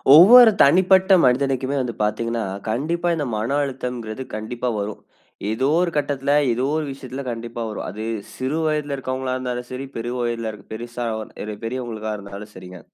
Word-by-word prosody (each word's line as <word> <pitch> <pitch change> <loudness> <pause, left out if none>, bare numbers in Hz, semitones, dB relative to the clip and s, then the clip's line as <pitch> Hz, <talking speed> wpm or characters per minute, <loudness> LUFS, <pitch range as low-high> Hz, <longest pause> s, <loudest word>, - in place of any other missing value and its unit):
ஒவ்வொரு 225 +7 +10
தனிப்பட்ட 190 +5 +5
மனிதனுக்குமே 135 +1 +1
வந்து 120 -2 -4
பார்த்தீங்கன்னா, 115 +2 -1 0.3
கண்டிப்பா 165 +10 -1
இந்த 150 -3 -2
மன 115 +6 -1
அழுத்தங்கிறது 125 -3 -4
கண்டிப்பா 120 +3 -3
வரும். 105 +1 -5 0.5
ஏதோ 130 +5 0
ஒரு 180 -1 +1
கட்டத்தில, 140 -1 0 0.2
ஏதோ 125 +3 -1
ஒரு 155 - -1
விஷயத்தில 135 0 -7
கண்டிப்பா 115 0 -6
வரும். 105 - -5
அது 105 +4 -6 0.3
சிறு 130 +4 -2
வயதுல 150 -2 0
இருக்கிறவங்களாருந்தாலும் 130 -2 -3
சரி, 130 +2 -5
பெரு 115 +1 -3
வயதில 120 -2 -2 0.2
பெருசா 120 +2 -5
அ 110 - -4 0.2
இரு 105 0 -5
பெரியவங்களுக்கா 115 -2 -4
இருந்தாலும் 100 +1 -9
சரிங்க. 90 -1 -10
125 Hz, 150 wpm, -22 LUFS, 115-140 Hz, 0.5 s, ஒவ்வொரு